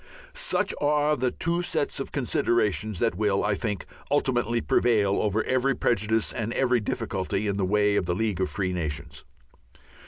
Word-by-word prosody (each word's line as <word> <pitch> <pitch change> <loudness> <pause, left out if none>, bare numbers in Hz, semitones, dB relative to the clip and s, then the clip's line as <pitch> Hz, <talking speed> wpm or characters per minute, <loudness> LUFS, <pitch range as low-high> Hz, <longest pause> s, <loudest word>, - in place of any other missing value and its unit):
Such - - 0
are 150 +1 +2
the 130 -1 0
two 170 +6 -1
sets 175 -6 0
of 135 - -5
considerations 110 -6 0
that - - +1
will, 100 +1 +1
I 105 - +1
think, 105 -2 -3 0.2
ultimately 120 -4 +1
prevail 105 -4 +2
over 105 +1 0
every 130 +1 +1
prejudice 110 -1 +1
and 115 0 -3
every 125 -2 +2
difficulty 105 -3 -2
in 100 -1 -1
the 100 - +1
way 105 +1 +2
of 85 - 0
the 90 - 0
League 105 -3 -1
of 95 - 0
Free 95 -2 -2
Nations. 75 -3 -4
110 Hz, 165 wpm, -26 LUFS, 100-125 Hz, 0.2 s, are